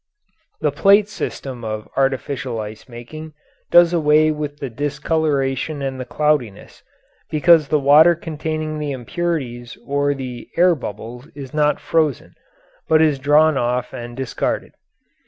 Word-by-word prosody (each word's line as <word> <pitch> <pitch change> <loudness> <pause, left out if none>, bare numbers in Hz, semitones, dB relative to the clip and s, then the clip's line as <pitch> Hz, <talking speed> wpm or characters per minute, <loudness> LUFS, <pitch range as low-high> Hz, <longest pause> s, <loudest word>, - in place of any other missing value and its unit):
The - - +1
plate 200 +1 +4
system 135 - -6
of 110 -1 -5
artificial 135 -2 -1
ice 110 +3 -8
making 155 +7 -9 0.4
does 175 0 +6
away 155 -1 +4
with 150 -1 -5
the 140 - -5
discoloration 145 +1 -1
and 135 -1 -3
the 130 - -5
cloudiness, 145 -6 -1 0.5
because 155 0 +4
the 150 - +2
water 150 +4 +6
containing 155 -1 -4
the 145 -2 -3
impurities 125 -3 -4
or 145 0 0
the 125 -3 -7
air 180 +1 +5
bubbles 120 -1 -7
is 135 -3 -9
not 150 -1 +2
frozen, 155 -5 -1 0.6
but 155 - +5
is 155 -3 +3
drawn 150 +1 +4
off 125 +1 -1
and 120 0 -8
discarded. 135 -2 -3
145 Hz, 135 wpm, -20 LUFS, 125-155 Hz, 0.6 s, does